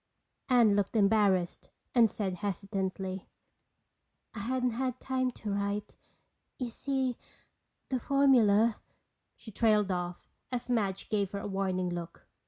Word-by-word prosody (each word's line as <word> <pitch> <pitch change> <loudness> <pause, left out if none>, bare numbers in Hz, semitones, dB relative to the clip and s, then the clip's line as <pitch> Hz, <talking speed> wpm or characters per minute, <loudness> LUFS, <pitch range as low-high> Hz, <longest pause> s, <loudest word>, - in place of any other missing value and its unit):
Anne 235 -5 +5
looked 205 +2 0
embarrassed 200 -4 +2 0.2
and 235 -3 +6
said 190 -4 -3
hesitantly: 190 -1 -3 1.1
"I 225 - -6
hadn't 250 +3 0
had 255 +1 -2
time 260 -1 0
to 210 -3 -5
write. 200 +1 -2 0.6
You 250 -3 -3
see, 265 -1 -1 0.7
the 260 - 0
formula—" 235 -5 +4 0.6
she 220 - -11
trailed 210 -2 +3
off 175 -1 -4 0.2
as 250 0 -3
Madge 200 -5 0
gave 200 -3 0
her 200 - -2
a - - -6
warning 190 -2 -1
look. 170 -1 -6
210 Hz, 125 wpm, -30 LUFS, 195-245 Hz, 1.1 s, and